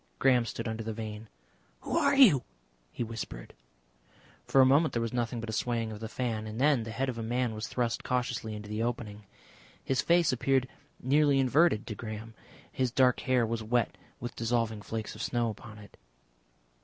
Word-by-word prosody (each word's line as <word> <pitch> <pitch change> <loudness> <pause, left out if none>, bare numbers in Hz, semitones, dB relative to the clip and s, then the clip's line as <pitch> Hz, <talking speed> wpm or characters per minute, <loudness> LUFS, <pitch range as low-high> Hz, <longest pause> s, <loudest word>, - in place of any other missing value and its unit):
Graham 125 - +3
stood - - -4
under 110 0 -3
the 110 0 -4
vane. 110 -1 -7 0.5
"Who - - -3
are 280 0 +3
you?" 220 - +7 0.5
he - - -3
whispered. 110 - -7 0.9
For 135 - +3
a 130 - +8
moment 145 +5 +4
there 115 - 0
was 115 0 -3
nothing 120 -1 -1
but 115 - -5
a 110 - -4
swaying 115 0 -1
of 105 - -7
the 110 0 -6
fan, 115 -3 -3
and 110 +2 -6
then 140 -2 +4
the 115 - -6
head 130 +5 -2
of 120 -3 -3
a - - -2
man 120 +1 -1
was 110 +2 -4
thrust 120 -2 -1
cautiously 120 -3 -2
into 105 0 -8
the 105 +1 -3
opening. 110 -3 -4 0.6
His 130 -1 +1
face 170 -3 +3
appeared 130 +1 +1 0.3
nearly 140 +2 +3
inverted 135 -2 +3
to 110 - -5
Graham; 110 +1 -7 0.4
his 130 -1 0
dark 125 +1 +3
hair 125 -2 +2
was 115 0 -2
wet 115 +1 0 0.2
with 120 0 -6
dissolving 115 -2 -1
flakes 110 +1 -5
of - - -8
snow 120 -2 0
upon 105 0 -11
it. 105 -1 -14
115 Hz, 190 wpm, -30 LUFS, 110-130 Hz, 0.9 s, a